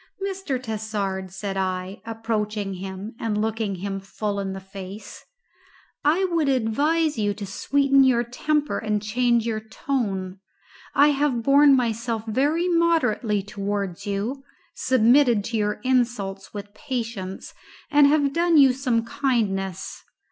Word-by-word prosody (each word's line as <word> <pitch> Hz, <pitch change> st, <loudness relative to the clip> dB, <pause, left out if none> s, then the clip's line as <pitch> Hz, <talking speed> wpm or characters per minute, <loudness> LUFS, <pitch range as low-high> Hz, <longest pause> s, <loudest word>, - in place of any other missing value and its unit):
"Mr. 385 Hz, -9 st, -3 dB
Tassard," 210 Hz, -5 st, -3 dB
said 195 Hz, +1 st, -5 dB
I, 185 Hz, 0 st, -3 dB
approaching 215 Hz, -3 st, -2 dB
him 190 Hz, +3 st, -7 dB
and 215 Hz, -2 st, -1 dB
looking 220 Hz, -2 st, -1 dB
him 195 Hz, +1 st, -4 dB
full 200 Hz, +1 st, -4 dB
in 195 Hz, -1 st, -3 dB
the 190 Hz, -, -6 dB
face, 195 Hz, +2 st, -10 dB, 0.8 s
"I 330 Hz, +6 st, +3 dB
would 320 Hz, -4 st, +2 dB
advise 285 Hz, +5 st, +1 dB
you 205 Hz, -1 st, 0 dB
to 205 Hz, -, -6 dB
sweeten 275 Hz, +7 st, +3 dB
your 245 Hz, -2 st, +3 dB
temper 295 Hz, +5 st, -1 dB
and 210 Hz, -1 st, -1 dB
change 235 Hz, +2 st, +1 dB
your 225 Hz, -2 st, -1 dB
tone. 200 Hz, -4 st, -3 dB, 0.6 s
I 290 Hz, +1 st, +6 dB
have 280 Hz, -5 st, +1 dB
borne 280 Hz, +2 st, +6 dB
myself 230 Hz, -2 st, -1 dB
very 290 Hz, +10 st, +1 dB
moderately 285 Hz, -, +2 dB
towards 200 Hz, -2 st, -4 dB
you, 215 Hz, +8 st, -3 dB, 0.3 s
submitted 245 Hz, -2 st, +4 dB
to 230 Hz, +2 st, -2 dB
your 210 Hz, -1 st, -1 dB
insults 235 Hz, -7 st, 0 dB
with 205 Hz, 0 st, -8 dB
patience, 230 Hz, -8 st, -5 dB, 0.4 s
and 290 Hz, -1 st, +6 dB
have 285 Hz, -1 st, +2 dB
done 340 Hz, -1 st, +3 dB
you 270 Hz, -3 st, +7 dB
some 245 Hz, -3 st, 0 dB
kindness. 220 Hz, -, -2 dB
225 Hz, 135 wpm, -24 LUFS, 200-275 Hz, 0.8 s, you